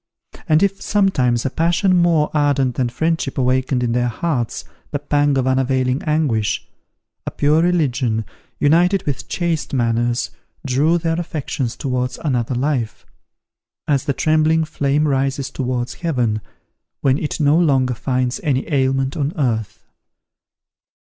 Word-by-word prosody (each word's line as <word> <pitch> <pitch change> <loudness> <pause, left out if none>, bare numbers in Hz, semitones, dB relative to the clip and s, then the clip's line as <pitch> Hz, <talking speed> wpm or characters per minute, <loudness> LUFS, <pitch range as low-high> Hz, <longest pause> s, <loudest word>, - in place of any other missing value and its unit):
And 155 +4 +4
if 195 0 0
sometimes 130 - +1
a 135 - 0
passion 175 +3 +2
more 170 -3 +3
ardent 145 -4 +2
than 125 0 -1
friendship 160 +2 -1
awakened 130 0 +1
in 120 - 0
their 120 +1 +1
hearts 120 -1 -2 0.2
the - - -2
pang 145 -1 +1
of 130 - +1
unavailing 130 0 +1
anguish, 145 -9 0 0.6
a - - +1
pure 150 +3 +2
religion, 130 -10 +1 0.3
united 175 +6 +3
with 140 -4 -3
chaste 170 -5 -2
manners, 120 0 0 0.3
drew 145 +6 +2
their 165 0 -1
affections 145 -7 -3
towards 125 -2 -2
another 125 -4 -1
life: 125 -3 -2 0.8
as 140 -2 +1
the 140 - 0
trembling 155 +2 +2
flame 150 0 0
rises 135 0 -1
towards 125 -2 -2
heaven, 125 -11 -1 0.6
when 135 0 +2
it 150 - -3
no 145 0 +4
longer 135 -7 +2
finds 125 +1 -1
any 135 -3 0
ailment 135 -1 +1
on 145 +1 -1
earth. 115 -8 -2
135 Hz, 135 wpm, -19 LUFS, 125-155 Hz, 0.8 s, And